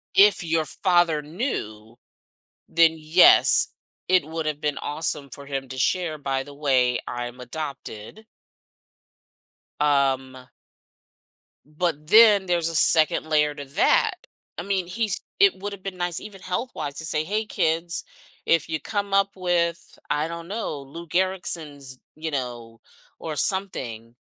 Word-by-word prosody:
if 195 Hz, -2 st, +5 dB
your 165 Hz, -1 st, 0 dB
father 175 Hz, -5 st, +1 dB
knew, 115 Hz, -, -5 dB, 0.7 s
then 165 Hz, -1 st, +4 dB
yes, 155 Hz, +4 st, +6 dB, 0.4 s
it 185 Hz, -5 st, +4 dB
would 160 Hz, +1 st, -5 dB
have 155 Hz, -1 st, -3 dB
been 150 Hz, -1 st, -2 dB
awesome 145 Hz, -2 st, -1 dB
for 140 Hz, +2 st, -10 dB
him 135 Hz, -2 st, -4 dB
to 130 Hz, 0 st, -8 dB
share, 160 Hz, +3 st, 0 dB
"By 135 Hz, -1 st, -2 dB
the 145 Hz, -, -12 dB
way, 130 Hz, -4 st, +1 dB
I'm 120 Hz, 0 st, -5 dB
adopted" 135 Hz, -, -8 dB, 1.5 s
um 135 Hz, -3 st, 0 dB, 1.2 s
but 155 Hz, -1 st, -3 dB
then 210 Hz, -1 st, +7 dB
there's 170 Hz, -2 st, 0 dB
a 165 Hz, -, -6 dB
2nd 155 Hz, 0 st, +4 dB
layer 150 Hz, -1 st, +2 dB
to 140 Hz, -1 st, -8 dB
that. 135 Hz, -, +1 dB, 0.3 s
I -, -, -3 dB
mean, 190 Hz, -2 st, -1 dB
he's 205 Hz, +1 st, -2 dB, 0.2 s
it 395 Hz, -2 st, +5 dB
would 205 Hz, +1 st, -5 dB
have 195 Hz, -, -11 dB
been 195 Hz, -2 st, -6 dB
nice 175 Hz, -1 st, -2 dB
even 200 Hz, -3 st, -11 dB
health-wise 180 Hz, -, -4 dB
to 160 Hz, -, -5 dB
say, 155 Hz, -1 st, 0 dB
"Hey 210 Hz, +5 st, -2 dB
kids, 170 Hz, -2 st, -1 dB, 0.4 s
if 165 Hz, -1 st, +2 dB
you 160 Hz, -1 st, -2 dB
come 200 Hz, +3 st, -4 dB
up 200 Hz, 0 st, +3 dB
with, 170 Hz, -2 st, -1 dB
I 150 Hz, +2 st, 0 dB
don't 170 Hz, 0 st, -7 dB
know, 195 Hz, -7 st, -4 dB
Lou 165 Hz, +5 st, -10 dB
Gehrig's, 160 Hz, -7 st, -1 dB, 0.2 s
you 160 Hz, +1 st, -5 dB
know, 120 Hz, -4 st, -5 dB, 0.4 s
or 155 Hz, -2 st, -5 dB
something, 120 Hz, -, -1 dB
160 Hz, 140 wpm, -24 LUFS, 140-180 Hz, 1.5 s, then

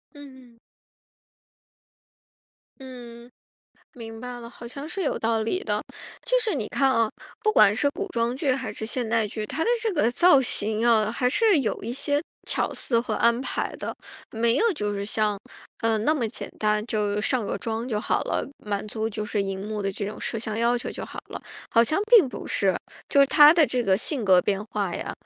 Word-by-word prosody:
嗯 260 Hz, -4 st, -14 dB
嗯。 -, -, -30 dB, 2.2 s
嗯， 240 Hz, -2 st, -11 dB, 0.6 s
明 225 Hz, -2 st, -9 dB
白 245 Hz, -1 st, -6 dB
了， 235 Hz, -, -9 dB
好 240 Hz, 0 st, -11 dB
像 280 Hz, +5 st, -7 dB
是 385 Hz, +3 st, -4 dB
有 300 Hz, -, -1 dB
道 225 Hz, -1 st, 0 dB
理 370 Hz, -, -2 dB
的。 -, -, -1 dB, 0.4 s
就 -, -, +3 dB
是 440 Hz, -5 st, 0 dB
你 235 Hz, -7 st, -2 dB
看 270 Hz, +4 st, +1 dB
啊， 230 Hz, -3 st, +2 dB, 0.3 s
不 430 Hz, -, +2 dB
管 205 Hz, -, +6 dB
是 285 Hz, +4 st, +2 dB
古 400 Hz, +6 st, -5 dB
装 235 Hz, -4 st, -1 dB
剧 275 Hz, -1 st, 0 dB
还 260 Hz, 0 st, -3 dB
是 220 Hz, -, -6 dB
现 245 Hz, 0 st, -2 dB
代 225 Hz, -1 st, +1 dB
剧， 215 Hz, 0 st, -5 dB
她 275 Hz, +9 st, -3 dB
的 -, -, 0 dB
这 445 Hz, -3 st, 0 dB
个 295 Hz, -8 st, +2 dB
造 345 Hz, +2 st, +5 dB
型 220 Hz, -2 st, 0 dB
啊， 220 Hz, -2 st, +3 dB
还 250 Hz, +1 st, +1 dB
是 410 Hz, -, +3 dB
有 220 Hz, -, -2 dB
一 230 Hz, +3 st, -4 dB
些 285 Hz, +3 st, -1 dB, 0.3 s
巧 -, -, +1 dB
思 235 Hz, -3 st, 0 dB
和 235 Hz, -, -2 dB
安 235 Hz, 0 st, +3 dB
排 -, -, -3 dB
的。 -, -, -5 dB, 0.4 s
没 230 Hz, +2 st, +1 dB
有 455 Hz, +3 st, +3 dB
就 210 Hz, -8 st, -3 dB
是 200 Hz, -, -3 dB
像， 210 Hz, -1 st, 0 dB, 0.4 s
呃， 225 Hz, -1 st, +2 dB
那 300 Hz, +9 st, +2 dB
么 250 Hz, -7 st, -1 dB
简 220 Hz, -, -6 dB
单， 210 Hz, 0 st, +1 dB
就 210 Hz, -2 st, -1 dB
上 235 Hz, 0 st, 0 dB
个 -, -, -3 dB
妆 225 Hz, +1 st, -3 dB
就 215 Hz, -4 st, -2 dB
好 -, -, 0 dB
了， -, -, -1 dB, 0.2 s
满 205 Hz, 0 st, -3 dB
足 220 Hz, +1 st, -3 dB
就 210 Hz, 0 st, -4 dB
是 210 Hz, -1 st, -1 dB
荧 195 Hz, -1 st, -4 dB
幕 210 Hz, -1 st, -3 dB
的 195 Hz, 0 st, -1 dB
这 200 Hz, 0 st, -4 dB
种 210 Hz, -, -6 dB
摄 230 Hz, -, -3 dB
像 220 Hz, 0 st, -4 dB
要 235 Hz, +1 st, +2 dB
求 -, -, -5 dB
就 -, -, -6 dB
好 -, -, -11 dB
了。 -, -, -8 dB, 0.3 s
好 230 Hz, 0 st, +5 dB
像 310 Hz, -, +1 dB
并 450 Hz, -, +8 dB
不 250 Hz, -, -8 dB
是， 190 Hz, -3 st, +2 dB, 0.4 s
就 280 Hz, -, +5 dB
是 275 Hz, -, +7 dB
她 295 Hz, +2 st, +8 dB
的 325 Hz, -3 st, +4 dB
这 250 Hz, -2 st, -1 dB
个 190 Hz, -3 st, +3 dB
性 255 Hz, -2 st, -2 dB
格 185 Hz, -2 st, +6 dB
变 200 Hz, +2 st, -1 dB
化 205 Hz, -4 st, -3 dB
呀， -, -, -4 dB
235 Hz, 230 characters per minute, -25 LUFS, 215-270 Hz, 2.2 s, 并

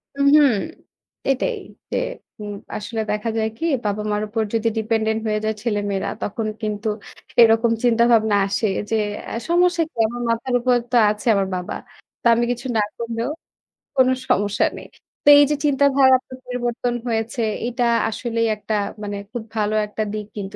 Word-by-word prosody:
উম 280 Hz, 0 st, +2 dB
হুম। 290 Hz, -3 st, +7 dB, 0.8 s
এটাই 270 Hz, -1 st, 0 dB, 0.3 s
যে -, -, 0 dB, 0.4 s
উ -, -, -5 dB, 0.3 s
আসলে 220 Hz, +2 st, -4 dB
দেখা 210 Hz, +2 st, -1 dB
যায় 220 Hz, 0 st, +1 dB
কি 330 Hz, -, -3 dB, 0.2 s
বাবা-মার 210 Hz, 0 st, -1 dB
উপর 220 Hz, +1 st, -1 dB
যদি 230 Hz, 0 st, +1 dB
ডিপেন্ডেন্ট 220 Hz, 0 st, 0 dB
হয়ে 215 Hz, 0 st, 0 dB
যায় 220 Hz, 0 st, 0 dB
ছেলেমেয়েরা। 205 Hz, -4 st, -1 dB
তখন 215 Hz, +2 st, -3 dB
কিন্তু 215 Hz, 0 st, -3 dB, 0.5 s
এরকম 225 Hz, +1 st, +5 dB
চিন্তাভাবনা 230 Hz, -3 st, +4 dB
আসে 205 Hz, +2 st, 0 dB, 0.2 s
যে 225 Hz, -, +1 dB, 0.5 s
সমস্যা 350 Hz, 0 st, +3 dB
কি? -, -, -59 dB
আমার 240 Hz, +2 st, -6 dB
মাথার 230 Hz, +2 st, -1 dB
উপর 250 Hz, +1 st, +2 dB, 0.2 s
তো -, -, +1 dB
আছে 210 Hz, +3 st, -4 dB
আমার 195 Hz, -1 st, +1 dB
বাবা। 180 Hz, 0 st, -4 dB, 0.5 s
তো -, -, -29 dB
আমি 235 Hz, +1 st, +2 dB
কিছু 245 Hz, +1 st, -4 dB
না 215 Hz, -, +4 dB, 0.2 s
করলেও 230 Hz, +2 st, -3 dB, 0.7 s
কোনো 260 Hz, -1 st, +4 dB, 0.2 s
সমস্যা 205 Hz, -3 st, +2 dB
নেই। -, -, -10 dB, 0.4 s
তো -, -, -11 dB
এই 290 Hz, -, +8 dB
যে 295 Hz, -, +3 dB
চিন্তাধার 275 Hz, -1 st, +4 dB, 0.4 s
পরিবর্তন 245 Hz, -1 st, -2 dB
হয়েছে 230 Hz, +2 st, -1 dB, 0.3 s
এটা 245 Hz, 0 st, 0 dB, 0.2 s
আসলেই 230 Hz, 0 st, -1 dB
একটা 215 Hz, +1 st, -5 dB, 0.3 s
মানে 205 Hz, -1 st, -4 dB
খুব 235 Hz, -2 st, -5 dB
ভালো 215 Hz, 0 st, 0 dB
একটা 215 Hz, +1 st, -3 dB
দিক 210 Hz, -1 st, -4 dB
কিন্তু 200 Hz, +1 st, -5 dB
225 Hz, 160 wpm, -21 LUFS, 210-245 Hz, 0.8 s, এই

